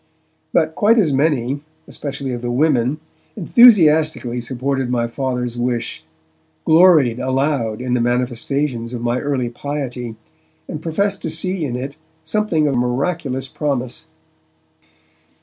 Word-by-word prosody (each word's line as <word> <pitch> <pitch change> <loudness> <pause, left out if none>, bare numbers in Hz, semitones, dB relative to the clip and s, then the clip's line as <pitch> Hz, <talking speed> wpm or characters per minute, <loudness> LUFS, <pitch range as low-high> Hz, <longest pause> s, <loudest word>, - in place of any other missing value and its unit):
But 160 0 +2
quite 215 +7 +3
as 170 -10 +3
many, 140 -1 +1 0.3
especially 140 -2 -5
of 120 - -5
the 120 - -3
women, 135 0 +2 0.4
enthusiastically 160 - +4
supported 130 +1 -2
my 120 -2 0
Father's 125 -1 -3
wish, 120 -8 -2 0.6
gloried 155 -8 +5
aloud 130 -4 -1
in 125 -1 -2
the 125 - +2
manifestations 125 +1 -1
of 120 - -5
my 120 +1 0
early 130 -4 -2
piety, 125 -3 -5 0.5
and 155 - -6
professed 195 +5 -1
to - - -3
see 180 +2 -1
in 125 -4 -3
it 135 +3 -5 0.3
something 160 -3 +1
of 140 - 0
miraculous 130 +2 -1
promise. 130 -4 -3
135 Hz, 125 wpm, -19 LUFS, 125-155 Hz, 0.6 s, gloried